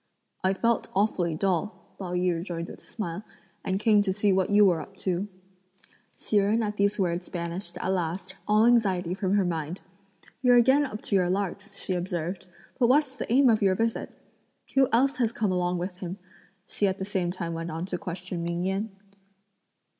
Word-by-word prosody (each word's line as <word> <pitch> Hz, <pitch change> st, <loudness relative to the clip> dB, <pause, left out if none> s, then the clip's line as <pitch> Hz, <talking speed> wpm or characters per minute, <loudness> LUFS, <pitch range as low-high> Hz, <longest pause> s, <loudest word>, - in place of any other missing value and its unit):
"I 190 Hz, +1 st, +2 dB
felt 230 Hz, +3 st, +1 dB
awfully 185 Hz, -5 st, +1 dB
dull," 195 Hz, +4 st, -2 dB
Pao 180 Hz, -2 st, -5 dB
yü 180 Hz, 0 st, +2 dB
rejoined 170 Hz, 0 st, -4 dB
with -, -, -11 dB
a -, -, -21 dB
smile, 195 Hz, -3 st, -5 dB, 0.4 s
"and 190 Hz, +1 st, -1 dB
came 215 Hz, -1 st, +4 dB
to 200 Hz, -2 st, 0 dB
see 200 Hz, +1 st, +2 dB
what 190 Hz, -1 st, +1 dB
you 205 Hz, 0 st, +6 dB
were 175 Hz, -4 st, +3 dB
up 195 Hz, -, -12 dB
to." 185 Hz, +1 st, 0 dB, 0.9 s
Hsi 215 Hz, -, 0 dB
Jen 210 Hz, +3 st, +3 dB
at 210 Hz, -1 st, -3 dB
these 200 Hz, +1 st, +1 dB
words 175 Hz, -1 st, -1 dB
banished, 175 Hz, +1 st, -4 dB
at 180 Hz, -, -3 dB
last, 185 Hz, 0 st, -2 dB
all 215 Hz, +1 st, +5 dB
anxiety 190 Hz, -7 st, +3 dB
from 190 Hz, +1 st, 0 dB
her 200 Hz, -2 st, +3 dB
mind. 165 Hz, 0 st, -3 dB, 0.6 s
"You're 250 Hz, -2 st, +5 dB
again 265 Hz, +4 st, +5 dB
up 215 Hz, -4 st, -8 dB
to 200 Hz, -, 0 dB
your 180 Hz, -2 st, +3 dB
larks," 200 Hz, +2 st, -3 dB
she 185 Hz, -, -1 dB
observed, 180 Hz, +1 st, -3 dB, 0.3 s
"but 240 Hz, -, +5 dB
what's 270 Hz, +1 st, +3 dB
the 235 Hz, -, -5 dB
aim 265 Hz, +2 st, +5 dB
of 220 Hz, -3 st, +4 dB
your 190 Hz, -2 st, +3 dB
visit? 225 Hz, +2 st, -1 dB, 0.6 s
Who 270 Hz, -1 st, +5 dB
else 270 Hz, +5 st, +3 dB
has 235 Hz, -4 st, +1 dB
come 215 Hz, -4 st, 0 dB
along 180 Hz, 0 st, 0 dB
with 180 Hz, +1 st, -4 dB
him?" 180 Hz, 0 st, -6 dB, 0.5 s
she 205 Hz, -, 0 dB
at 190 Hz, 0 st, -1 dB
the 190 Hz, -, -4 dB
same 190 Hz, -3 st, -1 dB
time 175 Hz, -2 st, -4 dB
went 165 Hz, +1 st, -4 dB
on 165 Hz, +2 st, -4 dB
to 185 Hz, -1 st, -3 dB
question 180 Hz, 0 st, -5 dB
Ming 170 Hz, +1 st, -2 dB
Yen. 195 Hz, +3 st, -1 dB
190 Hz, 195 wpm, -27 LUFS, 175-210 Hz, 0.9 s, you